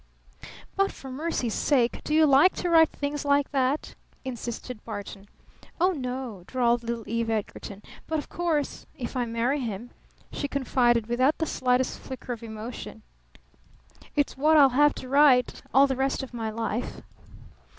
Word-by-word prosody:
"But 390 0 +2
for 265 - -10
mercy's 260 -5 -2
sake 250 -5 +1
do 305 - -1
you 315 0 +6
like 290 +6 +5
to 355 - -2
write 325 -1 +6
things 285 0 -4
like 285 -1 +2
that?" 270 +1 0 0.3
insisted 240 -2 -6
Barton. 205 -2 -7 0.5
"Oh, 365 +3 +4
no," 250 - -5
drawled 240 -2 +1
little 230 -1 -4
Eve 230 0 -1
Edgarton. 210 -2 -4 0.2
"But 320 - -1
of 295 - -4
course 325 -5 -2
if 245 +1 -5
I 250 -1 0
marry 235 +5 0
him," 235 -1 -5 0.4
she 285 - -3
confided 245 -4 +2
without 255 +6 +2
the 320 - 0
slightest 255 -3 0
flicker 255 -1 -6
of 230 - -9
emotion, 220 0 -8 1.1
"it's 290 -2 +1
what 305 +4 +4
I'll 280 -2 +8
have 290 +3 +4
to 255 - -8
write 270 -2 +4
all 270 +2 +6
the 270 -1 -1
rest 270 +1 -1
of 260 - -9
my 225 -2 -3
life." 225 +2 -3
255 Hz, 160 wpm, -26 LUFS, 235-285 Hz, 1.1 s, I'll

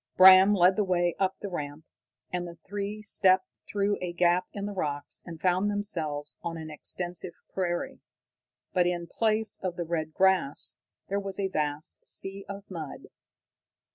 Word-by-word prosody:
Bram 190 +2 +9
led 185 0 +5
the 210 - +3
way 175 -2 +1
up 190 0 +1
the 205 - -3
ramp, 150 -3 -5 0.5
and 175 -1 -2
the 170 0 -10
three 205 +2 -4
stepped 190 -2 +3
through 205 0 0
a 180 -1 -3
gap 175 +1 +3
in 200 -1 -5
the 205 - -3
rocks 145 -6 -3
and 165 -2 -8
found 185 +3 +2
themselves 165 -8 -3
on 165 -1 -4
an 160 -1 -7
extensive 175 +3 -3 0.2
prairie. 175 -2 -2 0.7
But 180 -2 +3
in 175 -1 -1
place 220 +4 +1
of 180 -2 -2
the 175 - -3
red 160 -2 -3
grass 190 -7 +2 0.3
there 200 +1 0
was 195 -1 -4
a 195 -1 0
vast 150 -3 -2
sea 195 +1 -3
of 200 0 -6
mud. 160 -6 -7
180 Hz, 165 wpm, -28 LUFS, 170-195 Hz, 0.7 s, Bram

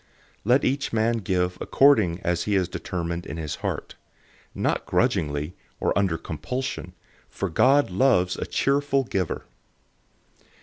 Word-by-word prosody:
009:007 - - -36 0.4
Let 125 +5 +4
each 135 +1 0
man 115 +1 +2
give 90 -2 -1
according 95 -11 +4
as 85 0 0
he 105 - +1
has 95 -2 +2
determined 85 -1 -4
in - - -6
his 75 -3 -4
heart; - - -4 0.6
not - - -1
grudgingly, 75 +2 0 0.3
or - - 0
under 95 -4 +1
compulsion; 90 - -5 0.4
for 100 - -3
God 135 - +4
loves 90 -4 +3
a - - -4
cheerful 140 0 +1
giver. 95 -8 -2
95 Hz, 135 wpm, -25 LUFS, 85-130 Hz, 0.6 s, Let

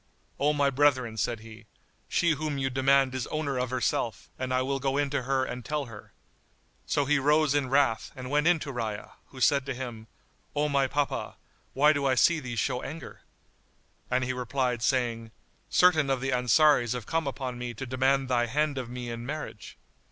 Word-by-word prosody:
"O 145 +2 +3
my 140 -2 +2
brethren," 130 -4 +2
said 110 +1 -2
he, 110 -1 -13 0.4
"she 170 - +2
whom 150 -1 -2
you 135 -1 -1
demand 135 0 +3
is 130 -2 -3
owner 145 -4 -2
of 125 0 -1
herself, 120 -2 -2
and 130 0 -3
I 130 0 +2
will 135 +1 -1
go 135 +1 -1
in 145 -1 0
to 140 - 0
her 130 +1 0
and 125 -1 -6
tell 150 +4 -2
her." 115 -4 -12 0.8
So 145 - +1
he 150 +1 +2
rose 150 +1 +3
in 145 -3 0
wrath[FN#88] 135 -5 +2
and 125 -1 -7
went 150 +2 +2
in 175 -1 +5
to 140 - -5
Rayya, 110 -4 -4 0.2
who 130 - -12
said 140 +2 +3
to 135 - -3
him, 120 -3 -7 0.5
"O 150 +1 +1
my 140 -2 +2
papa, 145 +1 -2 0.4
why 150 +3 +5
do 140 -1 0
I 130 - +3
see 165 +6 +4
thee 125 -4 -6
show 125 +2 -1
anger?" 155 +4 -8 0.9
And 125 +1 +1
he 130 +1 -1
replied, 125 -1 -1
saying, 120 -3 0 0.4
"Certain 160 -6 +4
of 135 -1 +1
the 135 +1 -2
Ansaris 125 0 +4
have 125 -4 -5
come 165 +2 -1
upon 130 -2 -4
me 120 -1 -5
to 135 - -5
demand 130 +1 +1
thy 120 -2 +1
hand 145 +3 0
of 125 -2 -6
me 125 -1 -5
in 115 0 -6
marriage." 150 +5 -7
130 Hz, 200 wpm, -28 LUFS, 125-145 Hz, 0.9 s, in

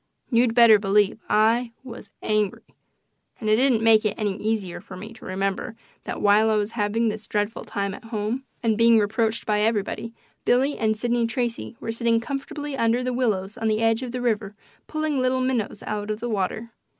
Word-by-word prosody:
You'd 235 -1 +3
better 230 -3 +7
believe 205 +1 +2
I 230 +3 +3
was 235 -5 -10
angry. 215 -2 0 0.8
And 215 -2 -1
it - - +6
didn't 245 -2 +2
make 225 -1 +6
it 210 -2 0
any 205 -3 -1
easier 205 -5 -2
for 185 -1 -11
me 215 +5 -9
to 225 - -14
remember 195 +3 -2 0.3
that - - -5
while 210 +2 +5
I 220 - +2
was 210 0 0
having 225 +1 0
this 215 0 -6
dreadful 205 +1 -2
time 200 -1 -3
at 200 - -11
home, 225 +3 -3 0.2
and 225 -1 +1
being 230 0 +6
reproached 220 +2 0
by 210 -1 +1
everybody. 220 +1 -1 0.3
Billy 270 +4 +2
and 220 -1 0
Sidney 240 +1 0
Tracy 235 0 -3
were 225 - -4
sitting 230 0 +1
comfortably 280 +3 -5
under 235 0 +1
the 255 0 -1
willows 215 -3 -1
on 225 - -1
the 215 0 +1
edge 225 +1 +2
of 250 -2 -5
the 250 0 -4
river 215 -4 -1 0.3
pulling 310 -3 -1
little 255 0 +1
minnows 255 -4 -1
out 210 0 -3
of 215 0 -2
the 240 - -4
water. 215 +2 -2
225 Hz, 195 wpm, -24 LUFS, 210-240 Hz, 0.8 s, better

